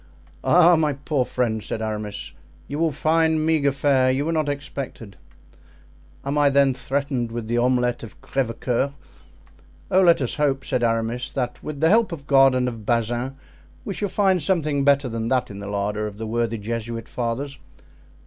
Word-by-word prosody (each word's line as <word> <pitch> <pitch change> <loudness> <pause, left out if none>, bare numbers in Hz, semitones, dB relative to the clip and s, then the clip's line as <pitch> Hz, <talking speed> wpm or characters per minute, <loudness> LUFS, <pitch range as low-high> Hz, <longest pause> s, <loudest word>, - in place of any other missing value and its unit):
"Ah, 175 0 +6
my 155 -2 +1
poor 140 0 -1
friend!" 120 -3 -1
said 110 - -5
Aramis, 105 -2 -4 0.3
"you 145 +2 -4
will 165 -1 +2
find 160 +1 +2
meagre 155 -3 +2
fare; 135 -2 +2
you 135 +3 0
were 165 - 0
not 155 -3 0
expected." 140 -7 -6 1.1
"Am 140 +2 0
I 145 -1 +5
then 140 -1 +4
threatened 135 -2 -2
with 115 -1 -5
the 120 +1 +1
omelet 125 0 +1
of 110 -4 -11
Crevecoeur?" 130 +1 -1 1.0
"Oh, 185 - +5
let 170 -2 +5
us 130 -4 -1
hope," 135 -2 +1
said 125 - -1
Aramis, 115 +1 0
"that 125 -3 -3
with 150 -2 -6
the 160 - +4
help 225 +1 +4
of 150 -5 -7
God 135 -2 +5
and 125 0 +1
of 115 -3 -5
Bazin 120 +4 -1 0.5
we 200 - -3
shall 205 +1 -3
find 190 -2 +2
something 150 -4 +1
better 140 -1 +3
than 115 -1 -3
that 130 -3 0
in 100 - -8
the 100 0 -6
larder 105 +1 -2
of 105 -1 -9
the 110 - -5
worthy 115 0 -1
Jesuit 115 +2 -4
fathers. 130 +4 -4
130 Hz, 175 wpm, -23 LUFS, 115-145 Hz, 1.1 s, Ah